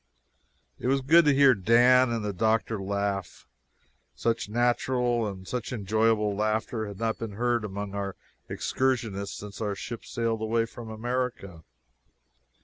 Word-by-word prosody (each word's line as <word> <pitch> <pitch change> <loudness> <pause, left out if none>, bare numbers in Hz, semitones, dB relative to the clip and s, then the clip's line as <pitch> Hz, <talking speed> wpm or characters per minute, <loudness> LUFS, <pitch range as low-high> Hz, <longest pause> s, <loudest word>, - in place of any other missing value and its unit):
It - - -3
was 135 +1 +2
good 165 +5 +5
to 150 - +5
hear 140 -1 +7
Dan 120 +5 +5
and 115 -2 -2
the 105 - -2
doctor 110 +2 0
laugh 100 0 -3 0.7
such 115 - -1
natural 120 0 +1
and 95 -2 -7
such 125 -1 -4
enjoyable 110 -1 +1
laughter 110 +1 -1
had 100 -2 -8
not 115 +1 -2
been 115 -3 -5
heard 120 +1 0
among 100 0 -5
our 100 -1 -3 0.3
excursionists 115 -7 -1
since 105 0 -9
our 105 -2 -1
ship 115 +3 -7
sailed 115 -2 -2
away 115 +1 +1
from 115 0 -10
America. 115 -6 -3
110 Hz, 140 wpm, -27 LUFS, 100-120 Hz, 0.7 s, hear